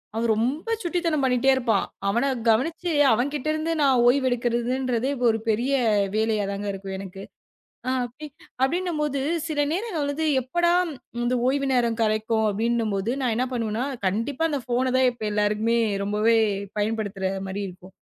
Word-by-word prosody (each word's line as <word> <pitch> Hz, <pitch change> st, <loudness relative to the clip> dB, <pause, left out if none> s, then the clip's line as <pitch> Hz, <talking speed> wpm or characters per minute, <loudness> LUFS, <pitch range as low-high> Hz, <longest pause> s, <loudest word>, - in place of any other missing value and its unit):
அவன் 225 Hz, 0 st, +1 dB
ரொம்ப 260 Hz, -, -1 dB
சுட்டித்தனம் 335 Hz, -5 st, 0 dB
பண்ணிட்டே 255 Hz, +1 st, +2 dB
இருப்பான். 230 Hz, -6 st, +1 dB, 0.2 s
அவனை 235 Hz, +7 st, +1 dB, 0.2 s
கவனிச்சு 325 Hz, +9 st, +1 dB, 0.2 s
அவன்கிட்ட 275 Hz, +5 st, 0 dB
இருந்து 310 Hz, +1 st, -2 dB
நான் 265 Hz, -4 st, +4 dB
ஓய்வு 260 Hz, +1 st, +3 dB
எடுக்கிறதுன்றதே 245 Hz, +1 st, 0 dB, 0.2 s
ஒரு 225 Hz, -1 st, +3 dB
பெரிய 235 Hz, +5 st, +1 dB, 0.4 s
வேலையா 220 Hz, -1 st, +1 dB
தாங்க 200 Hz, +1 st, -4 dB
இருக்கும் 195 Hz, 0 st, -6 dB
எனக்கு. 190 Hz, 0 st, -8 dB, 0.7 s
அ -, -, +1 dB, 0.2 s
அப்டி 295 Hz, +6 st, -9 dB, 0.3 s
அப்படின்னுபோது 300 Hz, -1 st, 0 dB, 0.3 s
சில 310 Hz, -3 st, -2 dB
நேரங்கள்ல 330 Hz, -7 st, -2 dB, 0.3 s
எப்படா 345 Hz, +7 st, +1 dB, 0.5 s
இந்த 240 Hz, -, +1 dB
ஓய்வு 275 Hz, +1 st, +1 dB
நேரம் 235 Hz, -2 st, +1 dB
கிடைக்கும் 220 Hz, 0 st, +1 dB
அப்படின்னு 230 Hz, +2 st, 0 dB
போது 195 Hz, +4 st, -1 dB
நான் 240 Hz, -4 st, 0 dB
என்ன 250 Hz, +2 st, +1 dB
பண்ணுவேனா? 230 Hz, +1 st, -1 dB, 0.2 s
கண்டிப்பா 235 Hz, -, -1 dB
அந்தப் 275 Hz, -6 st, -3 dB
போனை 255 Hz, +2 st, +2 dB
தான் 260 Hz, -1 st, +4 dB
இப்ப 240 Hz, -2 st, -10 dB
எல்லாருக்குமே 210 Hz, +3 st, +1 dB, 0.3 s
ரொம்பவே 210 Hz, +3 st, +2 dB, 0.4 s
பயன்படுத்துற 205 Hz, -2 st, -2 dB, 0.2 s
மாரி 190 Hz, +2 st, -4 dB
இருக்கும். 185 Hz, +1 st, -14 dB
240 Hz, 145 wpm, -24 LUFS, 220-275 Hz, 0.7 s, நான்